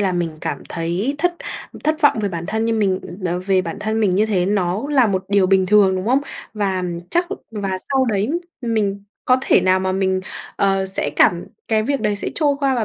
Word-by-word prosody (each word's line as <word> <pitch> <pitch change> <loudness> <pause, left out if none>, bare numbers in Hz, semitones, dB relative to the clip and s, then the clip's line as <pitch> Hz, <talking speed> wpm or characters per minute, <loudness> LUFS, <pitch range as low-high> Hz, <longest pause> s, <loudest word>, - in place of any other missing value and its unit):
là 190 -2 +1
mình 165 -3 -2
cảm - - -4
thấy 175 +10 -2
thất 355 +2 +1 0.5
thất 310 +1 +1
vọng 290 -6 +4
về 205 - 0
bản 170 -3 -5
thân 220 0 -1
như 230 - +1
mình 200 -4 +1 0.5
về 190 -2 +3
bản - - -5
thân 220 +1 -1
mình 195 -4 +2
như 210 +3 +3
thế, 185 -5 +1
nó 195 +1 0
là 265 -5 +4
một 190 -3 -1
điều 200 -2 +3
bình 190 0 +3
thường, 195 -1 +4
đúng 185 +2 -4
không? 260 +4 +3 0.3
Và 195 -3 -1 0.3
chắc 350 +1 +2 0.2
và 200 -4 -3
sau 265 -1 +3
đấy 215 0 0 0.3
mình 210 -5 -1 0.2
có 255 - +4
thể - - +4
nào 185 0 +3
mà 190 0 -1
mình, 190 0 0 0.4
ờ, 195 -1 +2
sẽ 190 - 0
cảm - - +4 0.2
cái 220 -1 +2
việc 275 +4 -1
đấy 205 -1 0
sẽ - - -2
trôi 295 -3 +2
qua, 275 -2 +2
và 235 - 0
200 Hz, 220 wpm, -20 LUFS, 190-225 Hz, 0.5 s, vọng